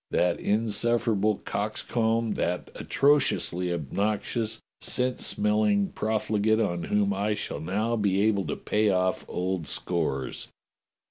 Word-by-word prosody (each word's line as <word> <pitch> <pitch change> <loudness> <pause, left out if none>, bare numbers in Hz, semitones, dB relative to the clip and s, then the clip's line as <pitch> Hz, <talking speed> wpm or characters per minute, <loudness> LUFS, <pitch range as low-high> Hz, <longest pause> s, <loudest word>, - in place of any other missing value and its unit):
That 90 -1 +1
insufferable 110 0 +1
cox - - -2
comb, 115 -1 0
that 90 0 -2
atrociously 130 -11 +2
obnoxious 105 - -1 0.2
scent 125 0 0
smelling 105 -1 +2
prof 110 0 -2
ligate 110 +1 +2
on 85 -1 -3
whom 100 -1 +1
I 105 +2 0
shall - - -4
now 105 +7 -1
be 100 -3 +1
able 100 -3 +2
to - - -2
pay 105 0 +1
off 95 -1 +1
old 90 -3 -2
scores." 75 -8 -2
105 Hz, 125 wpm, -27 LUFS, 95-110 Hz, 0.2 s, atrociously